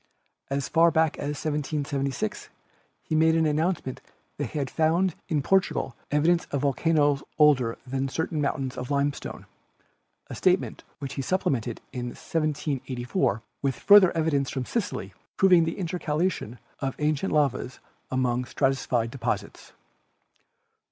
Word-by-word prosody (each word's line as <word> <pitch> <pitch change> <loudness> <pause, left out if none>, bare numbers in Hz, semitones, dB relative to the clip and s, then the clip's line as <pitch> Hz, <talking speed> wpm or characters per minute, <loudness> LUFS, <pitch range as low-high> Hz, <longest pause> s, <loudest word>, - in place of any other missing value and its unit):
As 140 0 -1
far 170 +1 +5
back 160 -1 +1
as 145 0 -3
1776 140 -5 -2 0.5
he - - -5
made 160 +1 +4
the 160 -1 +3
announcement 155 -3 -1 0.4
that - - -1
he - - -6
had 140 -2 -1
found 170 +3 +2 0.2
in 150 -5 +1
Portugal 190 -8 +1
evidence 165 +4 +2
of 140 - -3
volcanoes 145 0 +2 0.2
older 135 -7 +4
than 135 +1 -2
certain 160 +1 -2
moun 135 -2 -1
tains - - -15
of 125 0 -5
limestone 140 0 -2 0.4
— - - -43
a - - -8
statement - - +1
which 140 -1 -6
he 135 - -3
supplemented 130 - -1
in 125 -2 -3
1784 135 - -2 0.2
with 135 -2 0
further 195 +8 +7
evidence 145 -4 +1
from 130 -2 -3
Sicily, 120 - -3 0.2
proving 180 -3 +6
the 165 - -3
inter 180 -1 -3
calation 150 - -1 0.2
of 135 -1 -2
ancient 150 +4 0
lavas 145 -4 0 0.3
among 125 -1 0
stratified 125 -4 0
deposits. 120 -3 -4
145 Hz, 140 wpm, -26 LUFS, 130-160 Hz, 0.5 s, further